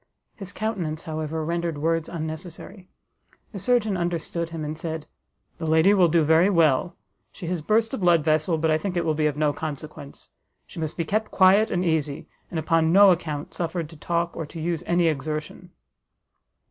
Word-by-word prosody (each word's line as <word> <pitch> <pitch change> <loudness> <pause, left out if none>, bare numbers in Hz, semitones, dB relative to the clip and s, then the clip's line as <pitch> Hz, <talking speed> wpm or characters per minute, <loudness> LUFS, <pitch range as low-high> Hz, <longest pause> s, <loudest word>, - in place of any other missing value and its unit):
His 195 -2 -9
countenance, 180 -9 -3
however, 155 0 -4
rendered 170 -1 -2
words 165 +2 0
unnecessary; 165 +3 -7 0.6
the 200 - -7
surgeon 220 0 +1
understood 170 -1 -2
him, 165 -2 -5
and 150 +1 -4
said, 160 -1 -5 0.5
"The 160 - -3
lady 160 +5 +5
will 185 -4 +5
do 165 0 +3
very 160 +5 +4
well; 165 -3 +2 0.4
she - - -9
has 175 -1 -2
burst 220 - +1
a 265 - -2
blood 175 -4 +3
vessel, 155 +2 +1
but 160 0 +1
I 155 - +2
think 185 0 -3
it 175 - 0
will 155 - +1
be 155 0 +1
of 150 -1 -3
no 150 -1 +1
consequence. 150 -2 -8 0.3
She - - -11
must 160 -1 -4
be 165 - -1
kept 215 +6 -1
quiet 195 +3 +5
and 180 +1 -1
easy, 155 -4 -1 0.2
and 170 - -5
upon 160 +1 +2
no 195 +1 +7
account 155 -4 -3
suffered 165 -2 -3
to - - -12
talk, 170 +2 -2
or 160 - -5
to 165 - -9
use 165 0 -2
any 175 0 +2
exertion." 155 +3 -4
165 Hz, 185 wpm, -24 LUFS, 155-180 Hz, 0.6 s, no